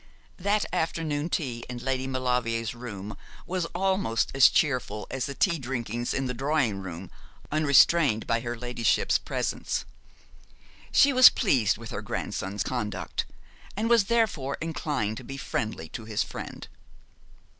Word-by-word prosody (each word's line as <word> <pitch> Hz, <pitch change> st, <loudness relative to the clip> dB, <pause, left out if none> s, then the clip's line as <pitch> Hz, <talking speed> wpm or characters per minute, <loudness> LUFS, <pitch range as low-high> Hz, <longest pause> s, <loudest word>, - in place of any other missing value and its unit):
That 205 Hz, +3 st, +1 dB
afternoon 160 Hz, -3 st, -1 dB
tea 125 Hz, -8 st, -2 dB
in 125 Hz, -, -5 dB
Lady 130 Hz, +1 st, -2 dB
Maulevrier's 125 Hz, -3 st, -1 dB
room 105 Hz, -4 st, -7 dB, 0.3 s
was 180 Hz, -2 st, -2 dB
almost 190 Hz, -, +1 dB
as 135 Hz, -3 st, +7 dB
cheerful 125 Hz, -8 st, 0 dB
as 130 Hz, -, -2 dB
the 140 Hz, -, -6 dB
tea 170 Hz, 0 st, +2 dB
drinkings 120 Hz, -2 st, -3 dB
in 135 Hz, -, -1 dB
the 125 Hz, -, -2 dB
drawing 135 Hz, -5 st, 0 dB
room, 90 Hz, -1 st, -7 dB, 0.4 s
unrestrained 150 Hz, -4 st, +4 dB
by 115 Hz, -, +1 dB
her 120 Hz, 0 st, -4 dB
ladyship's 120 Hz, -1 st, +1 dB
presence. -, -, -2 dB, 1.1 s
She 280 Hz, 0 st, +5 dB
was 255 Hz, 0 st, +10 dB
pleased 125 Hz, -, +2 dB
with 115 Hz, 0 st, -9 dB
her -, -, -4 dB
grandson's 95 Hz, +1 st, -3 dB
conduct, 105 Hz, -6 st, -3 dB, 0.5 s
and 225 Hz, +3 st, 0 dB
was 230 Hz, -4 st, +5 dB
therefore 195 Hz, -, 0 dB
inclined 145 Hz, -9 st, -2 dB
to -, -, -8 dB
be 135 Hz, +2 st, -7 dB
friendly 110 Hz, -9 st, -3 dB
to 110 Hz, -, -7 dB
his 110 Hz, -2 st, 0 dB
friend. -, -, -8 dB
130 Hz, 140 wpm, -27 LUFS, 115-160 Hz, 1.1 s, was